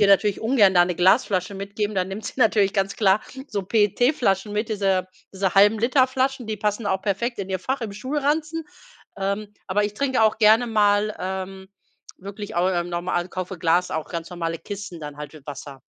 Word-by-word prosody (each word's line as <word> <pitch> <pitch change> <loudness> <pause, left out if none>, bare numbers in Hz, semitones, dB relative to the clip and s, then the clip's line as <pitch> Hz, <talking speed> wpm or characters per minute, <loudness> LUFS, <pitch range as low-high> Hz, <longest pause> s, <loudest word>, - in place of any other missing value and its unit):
ihr 205 - +6
natürlich 200 0 +3
ungern 220 -5 +4
da 175 - +6
'ne 180 0 -2
Glasflasche 190 +1 +2
mitgeben. 200 +2 -3
Dann 185 0 0
nimmt 210 +2 -6
sie - - -6
natürlich 215 -5 +3
ganz 195 0 0
klar 200 -1 +3 0.3
so 200 -2 -2
PET-Flaschen 210 0 +1
mit, 210 +1 -1
diese 195 -4 0 0.3
diese 190 -1 -1
1/2- 205 +2 +5
Liter-Flaschen, 260 +1 +1
die 215 -2 -4
passen 210 +1 -1
auch 190 -2 0
perfekt 215 +5 -2
in 195 -1 -4
ihr 190 -1 -1
Fach 260 +8 -3
im 215 -3 -4
Schulranzen. 300 +6 -1 0.5
Ähm, 200 +2 -3
aber 205 +2 +1
ich 205 - -3
trinke 260 -1 +1
auch 220 -1 +3
gerne 220 +2 +5
mal, 210 -1 +2
ähm, 190 +1 -5 0.5
wirklich 200 +2 -8
auch 175 +2 +2
im 175 -1 -1
norm 175 +1 -4
also, 175 0 -1
kaufe 185 0 -5
Glas 175 +2 +2
auch 160 -1 -4
ganz 165 -1 -5
normale 165 -2 -4
Kisten 200 -4 -7
dann 150 -1 -7
halt 150 0 -8
mit 155 -3 -15
Wasser. 140 -1 -8
200 Hz, 195 wpm, -23 LUFS, 185-220 Hz, 0.5 s, ihr